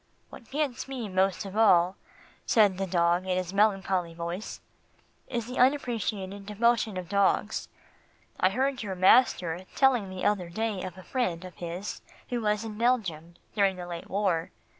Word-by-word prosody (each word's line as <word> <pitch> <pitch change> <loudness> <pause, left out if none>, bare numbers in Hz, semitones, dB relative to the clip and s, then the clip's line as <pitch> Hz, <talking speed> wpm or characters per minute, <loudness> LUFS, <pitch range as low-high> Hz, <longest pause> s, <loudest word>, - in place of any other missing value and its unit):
"What 235 - -13
gets 280 -4 -2
me 255 -5 -4
most 190 +1 +1
of 195 0 -7
all," 185 -4 +5 0.5
said 205 -4 +4
the 195 - -1
dog 175 +1 +1
in 185 -1 +1
his 185 0 -3
melancholy 195 -4 +1
voice, 170 +4 -5 0.7
"is 240 -3 -3
the 250 +2 -5
unappreciated 220 -7 0
devotion 220 -1 +1
of 180 -1 -5
dogs. 200 +1 +1 0.7
I 185 - +4
heard 260 +5 -1
your 195 -4 -4
master 185 -3 +4
telling 250 -8 +3
the 185 -1 -5
other 195 -4 +1
day 215 +1 -2
of 185 -1 -7
a 185 - -11
friend 185 -9 -2
of 180 - -11
his 175 +3 -5 0.3
who 245 -1 -2
was 210 0 0
in 215 -1 -7
Belgium 185 -9 0 0.2
during 200 -2 +2
the 180 -1 -7
late 170 -1 -7
war. 185 -4 0
195 Hz, 160 wpm, -28 LUFS, 180-225 Hz, 0.7 s, all